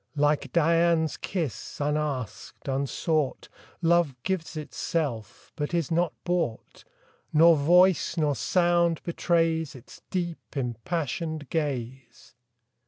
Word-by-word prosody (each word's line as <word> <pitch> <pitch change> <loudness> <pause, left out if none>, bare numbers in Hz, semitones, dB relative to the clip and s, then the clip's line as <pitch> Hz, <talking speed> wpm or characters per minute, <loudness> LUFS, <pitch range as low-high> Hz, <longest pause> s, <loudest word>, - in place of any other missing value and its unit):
Like 145 -2 +1
Dian's 165 -1 +3
kiss, 165 - -4
unasked, 145 -6 -3
unsought, 140 +2 -1 0.3
Love 170 -4 +3
gives 175 -4 -2
itself, 145 - -4
but 150 +2 -2
is 165 -4 -1
not 170 0 +2
bought; 175 -11 -2 0.5
Nor 165 +2 +7
voice, 175 +4 +4
nor 150 -3 +2
sound 175 -1 +2
betrays 165 -3 0
Its 125 -1 -13
deep, 175 -5 -4
impassioned 150 +4 -3
gaze. 130 -5 -4
160 Hz, 100 wpm, -27 LUFS, 140-170 Hz, 0.5 s, Nor